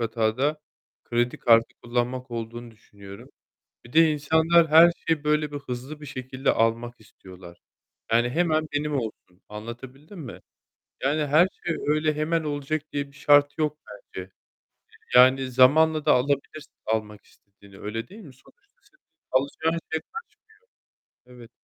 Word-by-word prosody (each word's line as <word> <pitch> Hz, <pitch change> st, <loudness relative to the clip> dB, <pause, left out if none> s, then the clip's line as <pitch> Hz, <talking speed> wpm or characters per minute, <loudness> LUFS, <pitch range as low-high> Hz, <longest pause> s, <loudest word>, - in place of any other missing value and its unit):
hata 110 Hz, -1 st, -1 dB
da 150 Hz, +4 st, 0 dB, 0.4 s
kredi 120 Hz, +1 st, -1 dB
kartı 115 Hz, -1 st, +3 dB
kullanmak 125 Hz, +1 st, -2 dB
olduğunu 120 Hz, +1 st, -6 dB
düşünüyorum. 100 Hz, -3 st, -14 dB, 0.6 s
Bir 120 Hz, -, -15 dB
de 160 Hz, -1 st, +5 dB
insanlar 160 Hz, +3 st, +3 dB
her 165 Hz, +3 st, +7 dB
şeyi 160 Hz, -2 st, 0 dB
böyle 150 Hz, 0 st, 0 dB
bir 145 Hz, -, -4 dB
hızlı 140 Hz, +2 st, -7 dB
bir 150 Hz, -, -10 dB
şekilde 130 Hz, -1 st, -3 dB
almak 115 Hz, +1 st, -1 dB
istiyorlar. 90 Hz, -4 st, -15 dB, 0.5 s
Yani 120 Hz, +1 st, +3 dB
hemen 155 Hz, 0 st, +1 dB
benim 145 Hz, +1 st, -2 dB
olsun, 110 Hz, -6 st, -7 dB
anlatabildim 125 Hz, -, -10 dB
mi? 130 Hz, -7 st, -9 dB, 0.6 s
Yani 150 Hz, +3 st, 0 dB
her 155 Hz, +6 st, +4 dB, 0.2 s
şey 170 Hz, -, 0 dB
öyle 155 Hz, +1 st, +1 dB
hemen 160 Hz, +2 st, -1 dB
olacak 145 Hz, +1 st, -3 dB
diye 145 Hz, 0 st, -2 dB
bir 140 Hz, -, -21 dB
şart 145 Hz, 0 st, +4 dB
yok 150 Hz, -1 st, -1 dB
bence. 100 Hz, -2 st, -10 dB
Eee, 95 Hz, +1 st, -10 dB, 0.8 s
yani 130 Hz, +1 st, +5 dB
zamanla 150 Hz, +5 st, +4 dB
da 150 Hz, -, +4 dB
alabilirsin 140 Hz, +3 st, -1 dB
almak 110 Hz, -1 st, -3 dB
istediğini, 100 Hz, -1 st, -20 dB
öyle 115 Hz, +3 st, -5 dB
değil 210 Hz, +4 st, -13 dB
mi? 145 Hz, -, -13 dB
Sonuçta 405 Hz, -, -26 dB
senin 390 Hz, -2 st, -30 dB, 0.3 s
alacağın 160 Hz, +5 st, 0 dB
şey 160 Hz, -, 0 dB, 1.1 s
kaçmıyor. 125 Hz, 0 st, -20 dB
Evet. 115 Hz, -, -14 dB
135 Hz, 145 wpm, -25 LUFS, 115-155 Hz, 1.1 s, her